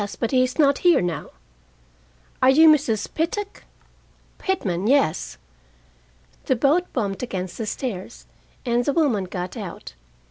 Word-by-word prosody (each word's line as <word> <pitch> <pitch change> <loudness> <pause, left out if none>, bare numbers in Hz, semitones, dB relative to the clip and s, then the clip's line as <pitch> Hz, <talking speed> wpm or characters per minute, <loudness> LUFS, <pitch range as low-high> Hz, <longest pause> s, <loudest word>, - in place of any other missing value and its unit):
But 230 - -1
he 255 -1 +4
is 255 0 -3
not 280 -3 +3
here 350 -2 +4
now." 175 -4 -3 1.1
"Are 255 - +5
you 315 +5 +7
Mrs. 265 -9 +3
Pittock?" 395 +6 -3 0.7
"Pitman, 205 - -1
yes." 265 - +1 1.1
The 260 - +2
boat 295 +8 +1
bumped 200 -6 -2
against 185 -6 -5
the 220 - -3
stairs, 220 -3 -5 0.4
and 240 0 +1
the 285 - 0
woman 260 - +1
got 180 0 -6
out. - - -8
250 Hz, 135 wpm, -23 LUFS, 195-295 Hz, 1.1 s, you